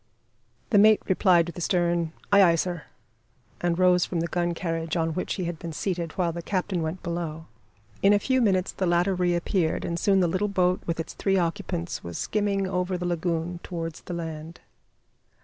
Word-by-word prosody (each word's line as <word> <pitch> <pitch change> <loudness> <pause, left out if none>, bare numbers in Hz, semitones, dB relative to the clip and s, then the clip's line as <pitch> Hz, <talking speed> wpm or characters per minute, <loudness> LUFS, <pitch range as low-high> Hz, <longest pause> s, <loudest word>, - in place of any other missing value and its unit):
The 205 - +6
mate 215 +1 +6
replied 180 -3 +4
with 170 0 -7
a - - -6
stern 170 -2 +1 0.2
"Ay, 200 0 +7
ay, 170 -3 +6
sir," 175 -2 -3 0.7
and 175 -1 0
rose 180 -1 +4
from 175 - -2
the 165 - 0
gun 175 +1 -1
carriage 165 -1 -2
on 165 0 0
which 180 - -2
he 185 - -3
had 170 -2 -4
been 165 -1 -6
seated, 170 -1 -3
while 175 -3 0
the 170 +1 -6
captain 185 0 -2
went 160 +3 -4
below. 165 -2 -4 0.6
In 200 - +5
a 205 - +6
few 260 +5 +1
minutes 190 -5 +2
the 190 - -2
latter 175 +3 +2
reappeared, 175 -1 0
and 170 0 -2
soon 195 +1 +3
the 180 - +3
little 185 +5 0
boat 185 -2 +1
with 170 -1 -2
its 165 - -4
three 195 -1 +1
occupants 170 0 -2
was 85 0 -6
skimming 200 -2 0
over 180 -1 -1
the 180 - -4
lagoon 175 0 -2
towards 165 -2 -5
the 175 - -6
land. 160 0 -6
175 Hz, 195 wpm, -26 LUFS, 165-185 Hz, 0.7 s, Ay